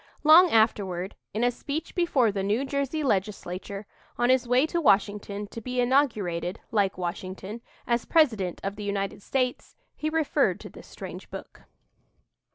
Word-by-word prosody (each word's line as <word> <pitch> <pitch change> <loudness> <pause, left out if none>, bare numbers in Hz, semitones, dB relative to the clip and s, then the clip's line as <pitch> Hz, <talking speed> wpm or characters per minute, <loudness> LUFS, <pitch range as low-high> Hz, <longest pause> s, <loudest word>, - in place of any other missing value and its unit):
Long 330 +4 +8
afterward, 200 - +1 0.2
in 220 +3 -1
a 245 - +3
speech 285 +6 -5
before 280 - +2
the 195 -1 -2
New 210 +7 0
Jersey 280 +2 -2
Legislature, 195 -3 -2 0.3
on 240 +1 +3
his 260 -1 +2
way 250 +4 +4
to 340 +2 -1
Washington 205 -3 +1
to 230 - -7
be 250 +2 -3
inaugurated, 215 - +1
like 200 -4 +1
Washington, 185 +4 -5 0.2
as 235 -1 0
President 220 - +2
of 195 +1 -3
the 210 - -6
United 200 0 -2
States, 255 +2 -2 0.2
he 310 - -2
referred 320 -2 +1
to - - -9
this - - -13
strange - - -9
book. - - -10
225 Hz, 155 wpm, -27 LUFS, 195-270 Hz, 0.3 s, Long